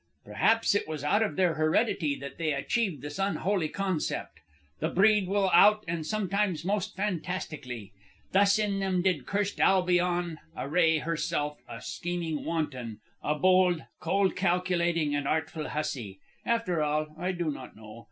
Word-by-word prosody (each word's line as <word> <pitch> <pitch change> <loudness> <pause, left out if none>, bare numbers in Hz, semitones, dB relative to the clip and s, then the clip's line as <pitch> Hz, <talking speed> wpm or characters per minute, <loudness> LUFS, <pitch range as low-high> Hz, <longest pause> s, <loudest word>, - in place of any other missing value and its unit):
"Perhaps 225 -1 +2
it 205 - 0
was 155 -3 -5
out 205 +9 +2
of 220 - 0
their 180 -3 +2
heredity 155 0 +1
that 140 +1 -9
they 160 -2 0
achieved 160 - -1
this 145 +4 -6
unholy 195 -3 0
concept. 185 - -3 0.4
The 160 - 0
breed 205 +2 +4
will 195 -1 +1
out 210 +4 +6
and 165 -1 -2
sometimes 195 -1 -1
most 205 +1 -1
fantastically. 155 - -4 0.4
Thus 200 +1 +4
in 205 -2 0
them 190 -2 0
did 185 -1 0
cursed 200 0 -1
Albion 175 -3 +2 0.2
array 160 +3 +2
herself 150 -2 -2
a 115 - -8
scheming 170 -3 -3
wanton, 130 -9 -3 0.2
a 150 - 0
bold, 185 0 +3 0.2
cold 190 +3 +1
calculating, 175 -4 +1
and 145 -1 -1
artful 160 0 -2
hussy. 120 -10 -4 0.3
After 230 -8 +1
all, 150 0 -1
I 180 +3 -2
do 175 -4 -2
not 130 -3 -9
know. 110 +1 -12
175 Hz, 150 wpm, -28 LUFS, 150-195 Hz, 0.4 s, out